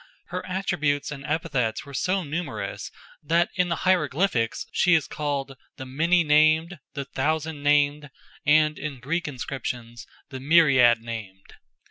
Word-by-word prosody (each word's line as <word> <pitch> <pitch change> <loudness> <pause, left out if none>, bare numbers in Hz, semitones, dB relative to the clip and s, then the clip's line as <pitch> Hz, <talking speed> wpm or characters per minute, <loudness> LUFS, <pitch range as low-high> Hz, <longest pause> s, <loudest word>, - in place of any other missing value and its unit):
Her 180 +1 -4
attributes 155 -7 -1
and 140 -2 -7
epithets 135 -7 -1
were 140 - -11
so 185 +7 0
numerous 140 - -5 0.3
that 170 +3 +1
in 180 -2 0
the 170 - 0
hieroglyphics 155 - +1
she 180 -1 +4
is 160 - +1
called 140 -2 -3 0.2
"the 130 - -7
many 165 +7 +2
named," 155 +3 +3 0.2
"the 140 -2 -4
thousand 155 +2 -2
named," 145 0 +2 0.3
and 150 0 +3
in 145 -4 -5
Greek 155 +8 -2
inscriptions 125 -3 -6 0.2
"the 130 -2 -7
myriad 135 -6 +5
named." 105 -5 -8
150 Hz, 135 wpm, -25 LUFS, 130-165 Hz, 0.3 s, myriad